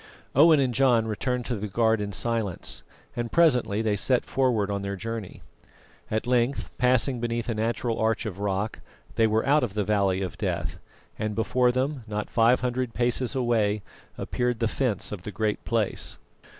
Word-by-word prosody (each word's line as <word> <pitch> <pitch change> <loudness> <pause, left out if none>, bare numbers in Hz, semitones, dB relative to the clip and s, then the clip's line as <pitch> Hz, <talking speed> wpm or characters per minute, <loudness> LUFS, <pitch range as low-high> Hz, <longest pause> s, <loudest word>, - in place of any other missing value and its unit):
Owen 155 +2 +6
and 130 -3 +1
John 120 -3 +3
returned 125 +3 -2
to 125 - -2
the 105 0 -4
guard 110 +1 +2
in 100 0 -3
silence, 110 -4 -2 0.3
and 120 -1 -3
presently 125 -10 +3
they 105 -2 +1
set 125 +5 +1
forward 120 -7 +1
on 100 0 -2
their 100 0 -3
journey. 115 -1 -6 0.7
At 110 +2 -1
length, 125 +2 0
passing 125 0 +2
beneath 115 -1 -2
a - - +1
natural 115 +1 -1
arch 110 +1 +1
of 100 -3 -5
rock, 100 +1 -2 0.3
they 115 -1 +3
were 110 +1 +1
out 145 +1 +4
of 105 -5 -3
the 105 - +1
Valley 100 -2 +1
of 90 -3 -6
Death, - - -2 0.4
and 110 -1 -2
before 125 +2 +2
them, 130 +1 -1
not 105 0 -4
five 115 +2 +4
hundred 125 -1 -2
paces 125 +2 0
away, 110 -5 +1 0.3
appeared 125 -1 -1
the 115 - +1
fence 115 -4 -1
of 105 -4 -5
the 105 - -6
Great 105 0 -1
Place. 115 -3 -1
115 Hz, 175 wpm, -26 LUFS, 105-125 Hz, 0.7 s, Owen